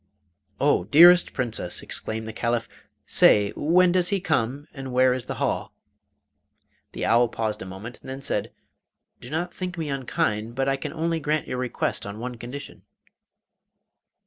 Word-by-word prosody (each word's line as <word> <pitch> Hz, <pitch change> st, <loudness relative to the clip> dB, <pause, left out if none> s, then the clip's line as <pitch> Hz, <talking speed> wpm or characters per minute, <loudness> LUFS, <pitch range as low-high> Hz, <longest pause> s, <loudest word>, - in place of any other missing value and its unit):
'Oh, 90 Hz, -, +2 dB
dearest 175 Hz, -, +7 dB
Princess!' 115 Hz, -8 st, -2 dB
exclaimed 110 Hz, 0 st, -4 dB
the 110 Hz, -, -6 dB
Caliph, 115 Hz, 0 st, -1 dB, 0.4 s
'say, 100 Hz, -1 st, +5 dB
when 175 Hz, +4 st, +3 dB
does 180 Hz, -1 st, +2 dB
he 200 Hz, -, +1 dB
come, 140 Hz, -4 st, -1 dB
and 135 Hz, -2 st, -7 dB
where 130 Hz, 0 st, +4 dB
is 125 Hz, -2 st, -5 dB
the -, -, -4 dB
hall?' -, -, -2 dB, 1.2 s
The -, -, -3 dB
owl 120 Hz, +1 st, +4 dB
paused 110 Hz, -2 st, -3 dB
a -, -, -6 dB
moment 100 Hz, +6 st, -9 dB
and -, -, -11 dB
then 135 Hz, +1 st, -7 dB
said: -, -, -2 dB, 0.7 s
'Do 120 Hz, -, -11 dB
not 170 Hz, +4 st, -3 dB
think 180 Hz, -1 st, -5 dB
me 160 Hz, -3 st, -3 dB
unkind, 115 Hz, -4 st, -2 dB
but 135 Hz, +1 st, 0 dB
I 135 Hz, -, +2 dB
can 135 Hz, -, -5 dB
only 165 Hz, 0 st, -1 dB
grant 150 Hz, 0 st, -1 dB
your 125 Hz, -, -3 dB
request 125 Hz, -4 st, -2 dB
on 100 Hz, +1 st, -7 dB
one 125 Hz, +1 st, -6 dB
condition. 125 Hz, +5 st, -8 dB
130 Hz, 165 wpm, -25 LUFS, 115-155 Hz, 1.2 s, dearest